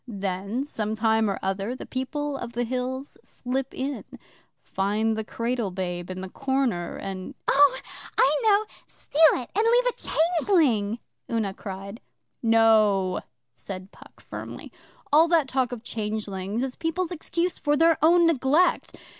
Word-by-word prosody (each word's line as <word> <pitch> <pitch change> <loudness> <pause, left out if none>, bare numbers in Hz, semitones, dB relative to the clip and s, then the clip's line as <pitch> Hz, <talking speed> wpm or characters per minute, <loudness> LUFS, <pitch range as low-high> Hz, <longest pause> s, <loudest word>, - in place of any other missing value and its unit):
Then, 200 +2 -3
some 220 -7 -3
time 220 -1 +2
or 195 - -1
other, 195 +5 -2
the - - -8
People 290 +2 -3
of 240 -3 -6
the 240 +1 -1
Hills 255 +3 -4
slip 260 +2 -4
in, 275 +1 -4 0.6
find 210 +3 0
the 220 - -2
cradle 230 0 -2
babe 180 -1 -4
in 185 0 -5
the 190 - -5
corner, 265 -9 -1
and 195 +7 -6
' - - -53
'Oh, 275 -2 +5 0.4
I - - +5
know. 425 -1 +4 0.2
Steal 300 - -4
it 245 - -4
and 430 - +2
leave 480 +2 +4
a 345 -8 0
changeling,' 240 - +2 0.3
Una 220 -4 0
cried. 195 +3 -8 0.4
'No,' 215 -5 +4 0.3
said 190 - -8
Puck - - -17
firmly. - - -8 0.4
'All 320 +3 +7
that 330 -4 +3
talk 260 -2 0
of 240 -2 -6
changelings 210 -1 -3
is 265 -1 -3
people's 330 +2 -2
excuse 345 +1 -2
for 295 -1 +1
their 330 +1 +4
own 340 +2 +6
neglect. 310 +2 +2
240 Hz, 150 wpm, -25 LUFS, 205-290 Hz, 0.6 s, All